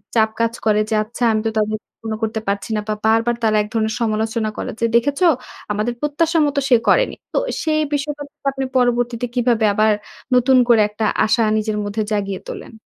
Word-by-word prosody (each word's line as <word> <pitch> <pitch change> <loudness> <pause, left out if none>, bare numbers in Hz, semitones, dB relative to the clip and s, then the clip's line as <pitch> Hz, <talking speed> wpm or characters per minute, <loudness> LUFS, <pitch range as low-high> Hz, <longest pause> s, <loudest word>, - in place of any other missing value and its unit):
চাপ 220 -1 +4
কাজ 230 0 +1
করে 215 -1 +3
যে - - -1
আচ্ছা 235 +3 -6
আমি 215 - +1
তো 225 - +2
তাদের 215 0 0 0.2
পূর্ণ 220 -1 -4
করতে 220 0 -1
পারছি 200 +2 -2
না 210 - 0
বা 215 - 0
বারবার 225 +2 +3
তারা 215 -1 +3
একধরনের 220 0 -2
সমালোচনা 220 0 0
করে। - - -4
যে, 230 - +2
"দেখেছো 285 +9 +2 0.5
আমাদের 215 +4 -1
প্রত্যাশার 315 +3 +1
মতো 285 0 0
সে 250 - +7
করেনি।" - - +3 0.2
তো - - 0 0.3
সেই 310 -1 +1
বিষয়টা 290 0 -2 0.3
আপনি 270 0 -3
পরবর্তীতে 245 -1 +1
কিভাবে 235 -3 +2
আবার 215 +1 +3 0.4
নতুন 255 +1 +4
করে 230 -3 +5
একটা 215 +1 -3 0.2
আশা 220 +2 +2 0.2
নিজের 215 0 -1
মধ্যে 205 +2 -2
জাগিয়ে 200 -2 -2
তোলেন? - - -8
225 Hz, 185 wpm, -19 LUFS, 215-250 Hz, 0.5 s, সে